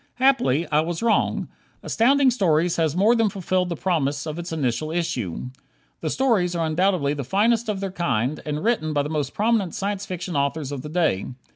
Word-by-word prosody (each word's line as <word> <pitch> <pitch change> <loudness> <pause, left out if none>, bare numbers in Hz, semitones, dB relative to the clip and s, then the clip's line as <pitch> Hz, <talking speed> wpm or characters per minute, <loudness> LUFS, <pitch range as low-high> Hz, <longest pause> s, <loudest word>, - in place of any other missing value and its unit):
Happily, 250 - +3
I 150 - +4
was 165 +5 -2
wrong. 230 -2 +1 0.4
Astounding 265 +3 +3
Stories 175 -7 +2
has 160 -2 +1
more 205 +6 +4
than 225 -3 +2
fulfilled 185 -1 -1
the 170 - -2
promise 145 -5 -1
of 155 +1 -5
its 175 0 -6
initial 150 -1 -1
issue. 125 - -3 0.5
The 155 - -3
stories 205 - +1
are 165 -1 0
undoubtedly 160 -2 +1
the 145 -1 -4
finest 220 - +1
of 200 -2 -2
their 195 -1 -3
kind, 145 - -1
and 150 +1 -3
written 205 -10 0
by 145 -1 +1
the 145 - -4
most 150 -3 -2
prominent 210 -4 +1
Science 200 0 -3
Fiction 180 -1 -5
authors 140 0 -1
of 140 -3 -4
the 150 - -7
day. 155 - 0
170 Hz, 190 wpm, -23 LUFS, 150-200 Hz, 0.5 s, I